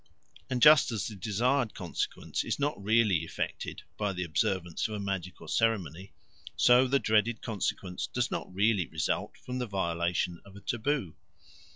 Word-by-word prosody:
And 125 -1 0
just 150 -4 +8
as 110 -3 -2
the 110 - -6
desired 115 +5 0
consequence 90 -4 -3
is - - -2
not 145 -7 -2
really 110 -3 +4
effected 85 - -4
by 105 -2 -1
the 90 0 -3
observance 90 0 -1
of 110 - -5
a - - -4
magical 90 -4 -4
ceremony, 95 -3 0 0.4
so 125 +1 +5
the 140 +2 +3
dreaded 110 -1 +1
consequence 95 -4 -3
does - - -1
not - - -4
really 100 -2 +2
result 80 -2 -2
from 125 0 -5
the 125 - -2
violation 85 -2 -1
of 100 -1 -15
a - - -9
taboo. 120 - -1
100 Hz, 160 wpm, -30 LUFS, 90-115 Hz, 0.4 s, just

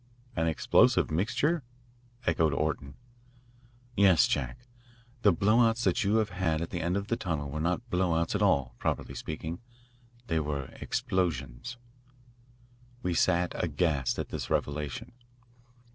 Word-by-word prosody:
"An 80 0 +1
explosive 80 -1 +3
mixture?" 120 - +1 0.6
echoed 80 -3 +2
Orton. 70 -2 -2 1.0
"Yes, 95 -5 +6
Jack, 70 - -2 0.6
the 100 - +6
blow 105 +7 +3
outs 115 0 +3
that 125 - +2
you 100 +2 +2
have 110 -2 +2
had 85 -3 0
at 85 - -4
the 85 - -2
end 85 +3 0
of 100 - -2
the 115 - +1
tunnel 80 - -3
were 75 - -3
not 90 +9 -1
blow 90 -2 +2
outs 85 0 0
at - - 0
all, 65 -4 +2
properly - - -2
speaking. 80 +2 -5 0.7
They 80 -8 0
were 70 -3 -3
explosions." 85 - -2 1.3
We 90 - 0
sat 85 +1 +2
aghast 75 -5 0
at - - -3
this - - -4
revelation. 70 -2 -2
85 Hz, 140 wpm, -29 LUFS, 75-100 Hz, 1.3 s, Yes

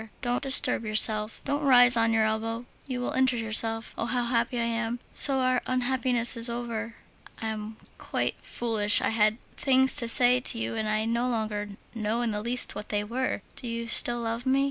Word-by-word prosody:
Don't 245 0 -1
disturb 265 -4 +4
yourself, 215 0 +3
don't 285 +2 -2
rise 245 -3 +5
on 230 0 +1
your 220 -1 +2
elbow, 225 +2 -3 0.2
you 255 -2 -4
will 245 - -3
injure 260 -1 +1
yourself. 225 0 -1
Oh! 230 - -2
how 245 0 -1
happy 235 0 -1
I - - 0
am! 230 +1 -3
So 275 -2 +5
our 255 -1 0
unhappiness 250 -1 0
is 230 +1 -1
over! 230 -1 -5 0.4
I 225 - -4
am 215 0 -7 0.2
quite - - -3
foolish. 220 -3 +2
I - - -1
had 215 0 +1 0.2
things 265 -1 +3
to 235 - 0
say 245 +2 +4
to 250 - -2
you, 115 0 -4
and 215 - -3
I 215 0 -1
no 235 +2 -1
longer 215 -3 -3 0.3
know 225 +1 -2
in 235 - -2
the 210 0 -4
least 240 +3 0
what 210 - -9
they 205 -1 -1
were. 240 -1 -4
Do 245 - -8
you 230 0 -5
still 240 +1 +4
love 230 +2 -4
me? 265 +1 +2
230 Hz, 200 wpm, -26 LUFS, 220-245 Hz, 0.4 s, rise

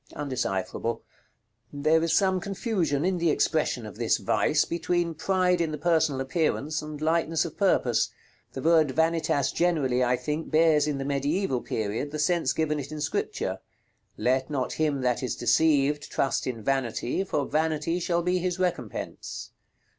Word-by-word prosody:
Undecipherable. 115 -5 -2 0.7
There 155 +3 +2
is 165 0 0
some 190 -2 +3
confusion 185 - -1
in 185 -1 0
the 170 -1 +2
expression 150 -6 +1
of 105 - -9
this - - +2
vice, - - +2
between 170 0 -1
pride 180 +2 +1
in 165 - 0
the 150 - -3
personal 160 -3 +1
appearance 155 +1 -1
and 150 -1 -7
lightness 160 0 +1
of 165 - -7
purpose. 130 - +2 0.4
The 130 - -6
word 160 -2 +4
Vanitas 160 -3 +1
generally, 145 -8 +1
I 125 0 +2
think, 150 +6 -3
bears, 155 -2 +4
in 145 -2 -1
the 135 - -3
mediæval 140 +1 -1
period, 110 +6 -2
the 155 - -5
sense 170 +3 +1
given 155 -1 0
it 140 +1 -7
in 155 - -5
Scripture. 145 - -2 0.6
"Let 130 +2 +1
not 135 -4 -2
him 150 -3 0
that 125 -1 0
is 125 - -2
deceived 145 +2 +2
trust 135 -2 0
in 115 -4 -4
Vanity, 135 - -1
for 150 -7 -1
Vanity 160 +2 0
shall 170 0 0
be 180 +1 +1
his 180 0 -1
recompense." 175 - -4
155 Hz, 160 wpm, -27 LUFS, 135-170 Hz, 0.7 s, word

